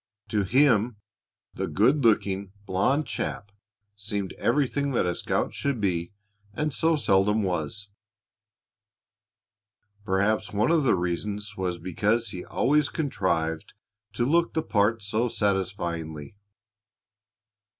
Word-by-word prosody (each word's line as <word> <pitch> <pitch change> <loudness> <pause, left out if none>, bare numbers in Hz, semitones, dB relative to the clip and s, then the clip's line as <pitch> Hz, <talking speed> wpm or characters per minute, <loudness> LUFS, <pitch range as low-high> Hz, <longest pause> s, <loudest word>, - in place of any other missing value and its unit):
To 105 - +1
him, 115 0 +3 0.6
the - - -3
good 130 +8 +3
looking, 100 -3 +1
blond 130 +12 +1
chap 100 - -4 0.4
seemed 100 -2 -4
everything 140 0 +1
that 120 - +2
a 90 - 0
scout - - -1
should 140 -4 -1
be 85 -4 -1 0.4
and 150 +2 -1
so 165 +4 +2
seldom 105 -5 +2
was. 95 +3 -2 2.1
Perhaps 105 +2 0
one 110 +6 +2
of 160 -4 +3
the 125 - +4
reasons 100 +4 -3
was 90 -2 -2
because 105 +6 0
he 90 -2 -5
always 145 +3 +2
contrived 95 - -1 0.4
to 120 - 0
look 170 +5 +2
the 160 - +1
part 110 -1 +1
so 110 +4 0
satisfyingly. 90 -7 -2
105 Hz, 115 wpm, -26 LUFS, 95-125 Hz, 2.1 s, the